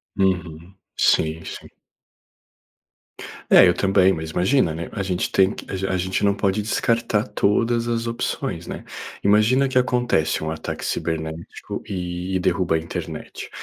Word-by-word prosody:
Uhum. 90 Hz, -2 st, -1 dB, 0.2 s
Sim, 80 Hz, +1 st, +2 dB
sim. -, -, -8 dB, 1.8 s
É, -, -, +8 dB
eu 90 Hz, -, +5 dB
também, 95 Hz, 0 st, +3 dB
mas 80 Hz, -2 st, -4 dB
imagina, 90 Hz, -, +2 dB
né, 85 Hz, 0 st, -5 dB
a 100 Hz, -, -3 dB
gente 95 Hz, -2 st, -2 dB
tem 95 Hz, +2 st, +3 dB
que -, -, -9 dB
a 95 Hz, 0 st, -2 dB
a -, -, +1 dB
gente 95 Hz, +1 st, -1 dB
não 100 Hz, 0 st, +3 dB
pode 100 Hz, +1 st, 0 dB
descartar 115 Hz, 0 st, 0 dB
todas 115 Hz, +3 st, +1 dB
as 115 Hz, 0 st, -1 dB
opções, 115 Hz, 0 st, -3 dB
né. -, -, -6 dB, 0.4 s
Imagina 110 Hz, +7 st, +4 dB
que 130 Hz, -, 0 dB
acontece 120 Hz, -12 st, +1 dB
um 80 Hz, -, -2 dB
ataque 80 Hz, -, -5 dB
cibernético 80 Hz, 0 st, -4 dB
e 90 Hz, 0 st, -4 dB
e -, -, +2 dB
derruba 80 Hz, -, +1 dB
a -, -, +3 dB
internet. 80 Hz, +1 st, -6 dB
95 Hz, 150 wpm, -22 LUFS, 85-110 Hz, 1.8 s, É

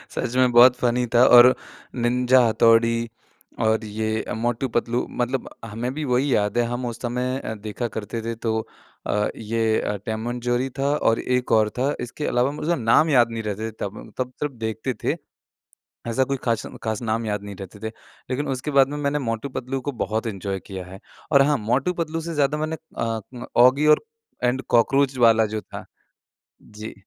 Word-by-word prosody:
सच 125 Hz, -1 st, -2 dB
में 130 Hz, -1 st, +4 dB
बहुत 120 Hz, +1 st, +7 dB
फ़नी 125 Hz, 0 st, +1 dB
था। 120 Hz, +2 st, +7 dB
और 125 Hz, +1 st, +8 dB, 0.4 s
निंजा 125 Hz, +1 st, +3 dB
हथौड़ी 115 Hz, +1 st, +3 dB, 0.5 s
और 110 Hz, 0 st, +2 dB
ये 110 Hz, +1 st, -2 dB
मोटू-पतलू 120 Hz, 0 st, -1 dB, 0.2 s
मतलब 125 Hz, +1 st, -2 dB, 0.2 s
हमें 115 Hz, +3 st, -4 dB
भी 155 Hz, +2 st, -4 dB
वही 130 Hz, +1 st, +1 dB
याद 105 Hz, +2 st, 0 dB
है 120 Hz, -, +4 dB
हम 120 Hz, +1 st, -3 dB
उस 120 Hz, -1 st, -4 dB
समय 125 Hz, +1 st, -2 dB
अ, 110 Hz, -, -5 dB
देखा 110 Hz, +3 st, -4 dB
करते 110 Hz, +1 st, -5 dB
थे। 115 Hz, +1 st, -4 dB
तो 110 Hz, 0 st, -1 dB, 0.5 s
अ, 105 Hz, +1 st, +1 dB
ये 110 Hz, 0 st, 0 dB, 0.2 s
टॉम 110 Hz, +1 st, -3 dB
एंड 120 Hz, 0 st, -4 dB
जेरी 125 Hz, +2 st, 0 dB
था 140 Hz, +1 st, +2 dB
और 115 Hz, -6 st, +2 dB
एक 125 Hz, -1 st, -1 dB
और 110 Hz, -1 st, +4 dB
था। 140 Hz, +3 st, +1 dB
इसके 125 Hz, +5 st, -5 dB
अलावा 125 Hz, +3 st, +1 dB
मुझे 155 Hz, +3 st, -1 dB
नाम 130 Hz, +5 st, +3 dB
याद 120 Hz, -5 st, +4 dB
नहीं 115 Hz, -1 st, -4 dB
रहते 105 Hz, +1 st, -3 dB
थे, -, -, -10 dB
तब 100 Hz, +1 st, -4 dB
म -, -, -10 dB
तब 130 Hz, 0 st, -3 dB
तब 145 Hz, -4 st, -3 dB
देखते 110 Hz, +3 st, -3 dB
थे। -, -, +1 dB, 0.9 s
ऐसा 115 Hz, +3 st, +2 dB
कोई 135 Hz, +1 st, -2 dB
ख़ास 115 Hz, -3 st, 0 dB
म -, -, -9 dB
ख़ास 110 Hz, 0 st, -2 dB
नाम 115 Hz, 0 st, -1 dB
याद 105 Hz, -1 st, -2 dB
नहीं 100 Hz, -1 st, -8 dB
रहते 95 Hz, +1 st, -9 dB
थे। -, -, -13 dB, 0.4 s
लेकिन 135 Hz, +3 st, -2 dB
उसके 135 Hz, +3 st, -3 dB
बाद 135 Hz, -1 st, +5 dB
में 145 Hz, -, -4 dB
मैंने 145 Hz, 0 st, 0 dB
मोटू-पतलू 130 Hz, +2 st, -3 dB
को -, -, +1 dB
बहुत 115 Hz, -2 st, -2 dB
एन्जॉय 100 Hz, -2 st, -4 dB
किया 95 Hz, -2 st, -6 dB
है। 95 Hz, +2 st, -11 dB, 0.3 s
और 140 Hz, -2 st, +6 dB
हाँ, 145 Hz, +1 st, +3 dB
मोटू 125 Hz, +10 st, 0 dB
पतलू 165 Hz, -1 st, -3 dB
से 165 Hz, +1 st, -5 dB
ज़्यादा 145 Hz, -1 st, +1 dB
मैंने 155 Hz, +1 st, -2 dB, 0.2 s
अ, 115 Hz, +2 st, -4 dB, 0.2 s
औगी 130 Hz, +4 st, +5 dB
और -, -, -12 dB, 0.4 s
एंड 125 Hz, +2 st, +1 dB
कॉकरोच 135 Hz, +3 st, +3 dB
वाला 115 Hz, -2 st, +5 dB
जो 110 Hz, -, -2 dB
था -, -, -10 dB, 0.8 s
जी। 105 Hz, +1 st, -9 dB
120 Hz, 190 wpm, -23 LUFS, 110-130 Hz, 0.9 s, और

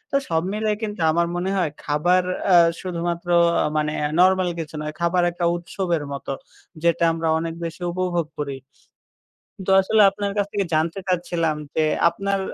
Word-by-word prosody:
তো -, -, +5 dB
সব 165 Hz, 0 st, +1 dB
মিলিয়ে 215 Hz, 0 st, 0 dB
কিন্তু 210 Hz, -4 st, -4 dB
আমার 170 Hz, +1 st, +1 dB
মনে 180 Hz, +2 st, -1 dB
হয় 170 Hz, -5 st, 0 dB
খাবার 175 Hz, +5 st, +2 dB, 0.2 s
অ্যা 180 Hz, -, +6 dB, 0.2 s
শুধুমাত্র 175 Hz, -1 st, -3 dB, 0.5 s
মানে 150 Hz, 0 st, 0 dB, 0.3 s
নরমাল 185 Hz, 0 st, +4 dB
কিছু 160 Hz, -1 st, -6 dB
নয়, 150 Hz, 0 st, -4 dB
খাবার 175 Hz, +1 st, +2 dB
একটা 175 Hz, 0 st, -2 dB
উৎসবের 170 Hz, -2 st, -2 dB
মতো, 140 Hz, 0 st, -5 dB, 0.5 s
যেটা 170 Hz, 0 st, +2 dB
আমরা 165 Hz, 0 st, -2 dB
অনেক 165 Hz, 0 st, -3 dB
বেশি 165 Hz, +2 st, -7 dB
উপভোগ 175 Hz, -2 st, -1 dB
করি। 140 Hz, -2 st, -4 dB, 1.1 s
তো -, -, +3 dB
আসলে 215 Hz, +3 st, +3 dB
আপনার 200 Hz, 0 st, -3 dB
কাছ 205 Hz, -, +2 dB
থেকে 200 Hz, -2 st, -1 dB
জানতে 165 Hz, +4 st, 0 dB
চাচ্ছিলাম 170 Hz, -3 st, 0 dB, 0.2 s
যে, 160 Hz, -, +2 dB, 0.3 s
আপনার 195 Hz, +3 st, -2 dB
175 Hz, 160 wpm, -22 LUFS, 165-185 Hz, 1.1 s, অ্যা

